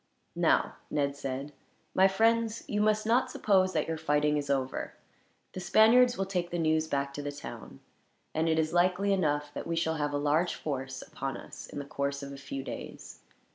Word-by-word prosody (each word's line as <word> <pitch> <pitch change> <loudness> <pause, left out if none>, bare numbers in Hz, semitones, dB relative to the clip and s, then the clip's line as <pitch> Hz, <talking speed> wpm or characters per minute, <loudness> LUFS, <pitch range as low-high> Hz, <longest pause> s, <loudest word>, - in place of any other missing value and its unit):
"Now," - - +2
Ned 140 -1 0
said, 140 +1 -5 0.4
"my 190 +1 +6
friends, 225 +3 +2
you 210 0 0
must 215 0 +2
not 245 +3 +3
suppose 190 -6 +2
that 155 - 0
your 160 -1 -3
fighting 150 -1 +2
is 145 -1 -2
over. 135 -2 -1 0.6
The - - -5
Spaniards 235 +7 +5
will 195 - 0
take 180 -3 -2
the 175 - -3
news 160 -1 +2
back 140 -2 -1
to 145 - -5
the 145 0 -4
town, 145 - -9 0.5
and 160 +1 +1
it 160 - +2
is 160 0 0
likely 185 +3 +3
enough 150 -5 0
that - - -5
we 165 - -1
shall 160 -1 0
have 145 -1 -1
a - - +1
large 150 +1 +1
force 130 -1 -4
upon 135 0 -5
us, - - -10
in - - -9
the 140 - -4
course 140 0 -3
of 140 - -7
a - - -8
few 135 0 -6
days. - - -8
160 Hz, 200 wpm, -30 LUFS, 140-190 Hz, 0.6 s, my